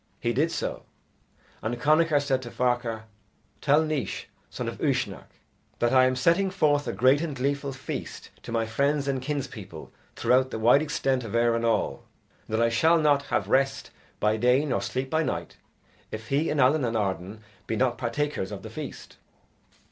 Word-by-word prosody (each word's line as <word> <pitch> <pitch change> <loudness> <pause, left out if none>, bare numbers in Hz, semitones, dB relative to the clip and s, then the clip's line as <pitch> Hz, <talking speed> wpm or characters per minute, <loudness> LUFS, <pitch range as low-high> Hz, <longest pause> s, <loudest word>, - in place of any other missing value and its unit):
He 120 - 0
did 155 +7 +1
so; - - -3 0.8
and 120 +2 -3
Connachar 155 +2 +4
said 135 -2 0
to 120 - -7
Ferchar, 120 -3 -1 0.6
"Tell 150 +2 +4
Naois, 155 -9 -3 0.2
son - - -5
of - - -5
Uisnech, - - -1 0.5
that 120 +1 +1
I 130 -1 +6
am 130 0 +1
setting 170 +9 +2
forth 150 -6 +1
a - - 0
great 130 +8 +3
and 160 -4 -3
gleeful 140 +2 -1
feast 130 -1 -7
to - - -9
my 115 -1 0
friends 140 +5 0
and 135 -2 -1
kinspeople 145 0 -6 0.2
throughout 130 +1 +2
the - - -4
wide 120 +6 +5
extent 135 -4 0
of 115 0 -5
Erin 115 0 +2
all, 115 -1 0 0.4
and 110 - -2
that 115 - +3
I - - +2
shall 160 +9 +4
not 145 -3 +3
have - - 0
rest 135 +1 +1 0.3
by 105 +1 +2
day 125 +5 +3
nor 125 -9 0
sleep 130 +7 -3
by 160 0 +2
night - - -3 0.5
if 110 +1 -7
he 145 +4 +1
and 150 - -1
Allen 140 +3 +4
and 115 -2 0
Arden 95 +1 -3 0.3
be 110 - -1
not 125 +1 +1
partakers 125 -4 -2
of - - -7
the - - -8
feast." - - -8
130 Hz, 180 wpm, -26 LUFS, 115-145 Hz, 0.8 s, I